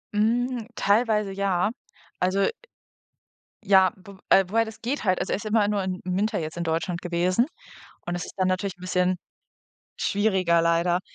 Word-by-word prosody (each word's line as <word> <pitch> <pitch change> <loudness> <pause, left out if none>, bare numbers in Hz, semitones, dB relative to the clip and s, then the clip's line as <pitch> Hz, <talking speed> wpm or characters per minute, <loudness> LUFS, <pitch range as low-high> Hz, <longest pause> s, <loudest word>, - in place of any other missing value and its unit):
Mm, 240 +2 +1
teilweise 210 -1 +2
ja. 195 +1 0 0.5
Also 185 +2 +2 1.2
ja, 190 -2 +5
wo 190 +1 -14
äh, 195 - +6
wobei 225 +3 +2
das 220 0 -10
geht 255 +3 -2
halt 185 -2 +2
also, - - -2
er - - +1
ist 215 - -9
immer 215 -1 +2
nur 205 -2 0
im 185 -1 -3
Winter 200 +4 0
jetzt 160 +1 -5
in 170 - -2
Deutschland 170 +2 -2
gewesen 180 - +1 0.6
und 175 - -2
das 175 - -3
ist - - -11
dann 185 -1 +1
natürlich 185 0 -1
'n - - -26
bisschen 180 0 +1 0.8
schwieriger 190 -5 +2
leider. 170 +2 +2
190 Hz, 165 wpm, -25 LUFS, 180-210 Hz, 1.2 s, äh